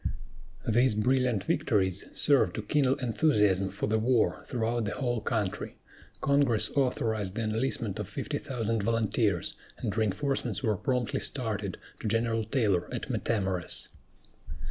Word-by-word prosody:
These 120 Hz, +1 st, +4 dB
brilliant 125 Hz, -2 st, +2 dB
victories 95 Hz, -1 st, +1 dB
served 135 Hz, -11 st, +4 dB
to 110 Hz, -, -3 dB
kindle 135 Hz, +3 st, +2 dB
enthusiasm 105 Hz, -7 st, +2 dB
for 100 Hz, +2 st, -3 dB
the 110 Hz, +1 st, +1 dB
war 115 Hz, -6 st, +2 dB
throughout 115 Hz, -1 st, -1 dB
the 100 Hz, -, -3 dB
whole 120 Hz, -4 st, -1 dB
country. 105 Hz, -3 st, -2 dB, 0.4 s
Congress 135 Hz, -6 st, +3 dB
authorized 110 Hz, -7 st, 0 dB
the 115 Hz, -, -1 dB
enlistment 110 Hz, -2 st, -1 dB
of -, -, -3 dB
fifty -, -, -3 dB
thousand 115 Hz, -4 st, -2 dB
volunteers, 110 Hz, -4 st, 0 dB, 0.2 s
and 100 Hz, -, -3 dB
reinforcements 110 Hz, +7 st, 0 dB
were 110 Hz, -4 st, +2 dB
promptly 125 Hz, +2 st, -1 dB
started -, -, -2 dB, 0.2 s
to -, -, -4 dB
General 115 Hz, +1 st, +1 dB
Taylor 105 Hz, -7 st, +1 dB
at -, -, -4 dB
Matamoras. 95 Hz, -5 st, -2 dB
110 Hz, 130 wpm, -29 LUFS, 105-125 Hz, 0.4 s, These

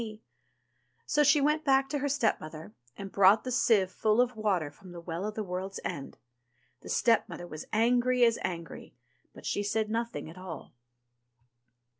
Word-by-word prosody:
'* -, -, -47 dB, 0.3 s
So 295 Hz, -, +2 dB
she 295 Hz, 0 st, +5 dB
went 300 Hz, +2 st, +2 dB
back 270 Hz, -1 st, +3 dB
to 290 Hz, -, -1 dB
her 285 Hz, +1 st, -1 dB
stepmother, 155 Hz, -, -2 dB, 0.2 s
and 195 Hz, -1 st, -7 dB
brought 200 Hz, +2 st, +5 dB
the 255 Hz, -, -4 dB
sieve 205 Hz, -6 st, +3 dB
full 215 Hz, +4 st, +1 dB
of 250 Hz, -1 st, +2 dB
water 190 Hz, -9 st, 0 dB
from 180 Hz, +4 st, -14 dB
the 175 Hz, -, -8 dB
Well 170 Hz, +3 st, -4 dB
of 215 Hz, -, -6 dB
the 215 Hz, -, -2 dB
World's 190 Hz, +1 st, -5 dB
End. 140 Hz, -, -5 dB, 0.6 s
The -, -, -12 dB
stepmother 230 Hz, -6 st, +1 dB
was 155 Hz, -3 st, -8 dB
angry 245 Hz, +3 st, +3 dB
as 230 Hz, -1 st, +2 dB
angry, 170 Hz, -2 st, -6 dB, 0.4 s
but -, -, -14 dB
she -, -, -1 dB
said 215 Hz, +1 st, -1 dB
nothing 230 Hz, -4 st, -3 dB
at 165 Hz, +3 st, -11 dB
all. 175 Hz, -6 st, -9 dB
215 Hz, 170 wpm, -29 LUFS, 180-245 Hz, 0.6 s, she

